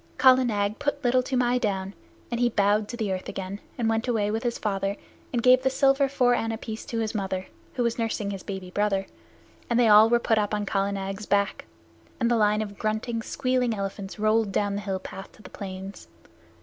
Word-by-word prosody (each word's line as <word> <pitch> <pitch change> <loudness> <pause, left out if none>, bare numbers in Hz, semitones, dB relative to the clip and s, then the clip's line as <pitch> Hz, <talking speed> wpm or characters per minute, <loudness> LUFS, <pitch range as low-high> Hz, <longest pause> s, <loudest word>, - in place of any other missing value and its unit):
Kala 260 -1 +6
Nag 205 -3 -1
put 285 0 -2
Little 255 +1 +3
Toomai 250 -1 +1
down, 195 -3 -2 0.4
and 235 - -1
he 245 0 +3
bowed 205 -1 +2
to 240 - -6
the 215 -4 -1
earth 185 - -5
again 195 +1 -5 0.2
and 235 -3 0
went 225 +2 0
away 215 -4 +1
with 220 +1 -1
his 240 -1 -1
father, 195 -1 -2 0.3
and 240 -2 -1
gave 255 0 +6
the 265 - +2
silver 275 +1 +3
four 250 -3 +3
anna 225 -2 -1
piece 220 -1 -7
to 230 - -4
his 220 -1 -1
mother, 190 -3 -2 0.3
who 245 - 0
was 235 0 -1
nursing 220 -3 -1
his 195 -2 -5
baby 190 -2 -6
brother, 200 -1 0 0.6
and 235 0 +2
they 240 - +5
all 215 +1 +8
were 240 - +5
put 225 -2 +1
up 210 0 0
on 210 0 -2
Kala 195 0 0
Nag's 195 +1 -5
back, 200 0 +1 0.5
and 235 -1 +2
the - - +4
line 210 -1 +3
of 200 -2 -9
grunting, 220 +2 -1
squealing 250 0 0
elephants 195 -1 -5
rolled 215 0 +2
down 205 +1 0
the 200 - -3
hill 195 -2 -2
path 195 +1 -9
to 215 - -18
the 185 - -12
plains. 190 0 -8
215 Hz, 215 wpm, -26 LUFS, 200-240 Hz, 0.6 s, all